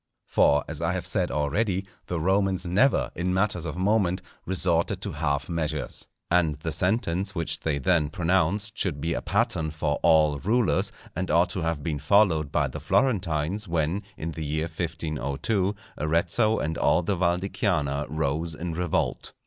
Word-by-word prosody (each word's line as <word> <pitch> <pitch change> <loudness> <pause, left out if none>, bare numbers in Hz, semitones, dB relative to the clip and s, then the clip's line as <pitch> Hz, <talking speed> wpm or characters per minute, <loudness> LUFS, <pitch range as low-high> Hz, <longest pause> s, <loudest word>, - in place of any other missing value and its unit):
For, 75 0 +3
as - - -5
I - - +1
have - - -3
said - - 0
already, 95 +7 0 0.2
the 85 - -2
Romans 95 +2 +1
never, 105 +10 +2
in 90 +2 -1
matters 95 -3 0
of 80 +1 -4
moment, 95 -1 +1 0.2
resorted 90 -2 +1
to - - -3
half 70 -2 -1
measures. 80 -3 -3 0.2
And 85 -4 +3
the 75 +3 -4
sentence 95 +1 0
which 85 -2 0
they 75 -3 -1
then 75 +2 +2
pronounced 95 +4 0
should 70 - 0
be 80 +3 -1
a - - -2
pattern 80 -1 0
for 75 -1 -1
all 80 -3 +4
rulers, 115 - +1 0.2
and 90 +2 -2
ought 85 +3 +3
to 90 - -3
have 80 -3 -2
been 75 -2 -2
followed 85 -6 +3
by 75 -4 +2
the 65 +4 -6
Florentines 95 - 0
when, 85 +3 0 0.2
in 80 +1 -4
the 80 +1 -5
year 80 +2 -1
1502, 85 - -2 0.2
Arezzo 85 +7 +2
and 80 +2 -2
all 80 +5 +3
the 100 +4 0
Val 85 -1 +2
di 95 +2 -4
Chiana 75 -9 0
rose 80 +2 -2
in 85 +1 -4
revolt. 90 -1 -1
85 Hz, 170 wpm, -26 LUFS, 75-95 Hz, 0.2 s, all